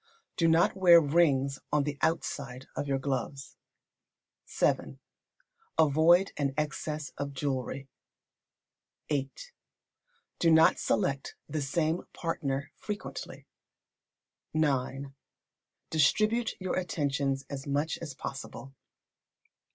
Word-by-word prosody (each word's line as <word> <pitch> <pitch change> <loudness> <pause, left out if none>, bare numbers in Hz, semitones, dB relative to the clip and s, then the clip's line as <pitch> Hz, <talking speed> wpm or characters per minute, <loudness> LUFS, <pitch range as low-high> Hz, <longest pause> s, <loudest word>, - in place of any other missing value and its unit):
Do 165 - +2
not 165 +3 +4
wear 175 -3 +8
rings 140 -4 +2
on 150 -1 +3
the 145 0 -4
outside 135 -5 -2
of 145 - -3
your 135 -1 +1
gloves. 135 0 -3 0.9
vii. - - 0 0.8
Avoid 160 +5 +5
an 140 -2 -1
excess 150 0 -3
of 140 -1 -4
jewellery. 135 -1 -3 1.2
viii. 140 -3 0 1.1
Do 170 - +4
not 160 0 +6
select 140 -9 0
the 155 - -2
same 155 +4 0
partner 145 -4 -3
frequently. 210 -1 -6 1.1
ix. 140 -3 0 0.8
Distribute 215 - +2
your 185 -1 -1
attentions 140 -5 -1
as 140 0 -6
much 145 +3 -1
as 150 -5 -7
possible. 135 0 -7
145 Hz, 95 wpm, -30 LUFS, 135-165 Hz, 1.2 s, wear